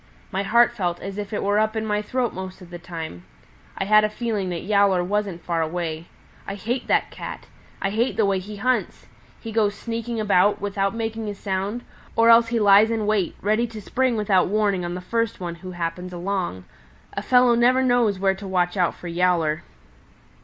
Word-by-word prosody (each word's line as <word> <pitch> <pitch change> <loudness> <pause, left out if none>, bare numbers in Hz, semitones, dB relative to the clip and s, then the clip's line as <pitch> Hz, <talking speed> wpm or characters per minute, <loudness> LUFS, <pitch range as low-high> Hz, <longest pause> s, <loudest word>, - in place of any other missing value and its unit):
My 195 0 -1
heart 235 +4 +4
felt 175 -7 -2
as 195 +1 -6
if 205 -1 -5
it 210 - -2
were 205 +1 +2
up 215 +1 +1
in 220 0 -1
my 210 -1 0
throat 245 +2 -1
most 185 0 -7
of 180 -2 -14
the 175 - -7
time. 165 - -7 0.5
I - - -1
had 215 +1 +5
a 215 - +2
feeling 215 -4 -2
that 175 -2 -4
Yowler 200 -2 +3
wasn't 195 -2 -2
far 170 -1 0
away. 160 0 -3 0.4
I 200 - -4
hate 235 +6 -3
that - - +1
Cat! - - -7 0.4
I 195 - 0
hate 230 +4 0
the 220 - +3
way 195 -1 +1
he 205 +3 -8
hunts! 250 +5 -1 0.3
He 225 - -7
goes 210 -2 +1
sneaking 230 +1 -4
about, 205 -1 +3
without 195 0 -1
making 225 -1 -3
a 205 - -5
sound, 200 +4 -3 0.3
or 230 0 +6
else 230 0 +6
he 235 0 0
lies 205 +1 +6
in 225 -2 -1
wait, 205 -4 0
ready 215 +4 +1
to 225 -2 -9
spring 250 +3 0
without 195 -4 +2
warning 200 -2 +1
on 175 0 -3
the 180 - -5
first 230 +4 -1
one 175 -2 -4
who 185 -1 -7
happens 175 +1 -4
along. 175 - -3 0.5
A - - -3
fellow 250 -1 +4
never 250 +2 +4
knows 245 -5 +2
where 190 0 +2
to 195 +1 -9
watch 180 -1 0
out 180 -3 +1
for 180 - -9
Yowler. 170 -3 +1
200 Hz, 205 wpm, -23 LUFS, 180-225 Hz, 0.5 s, or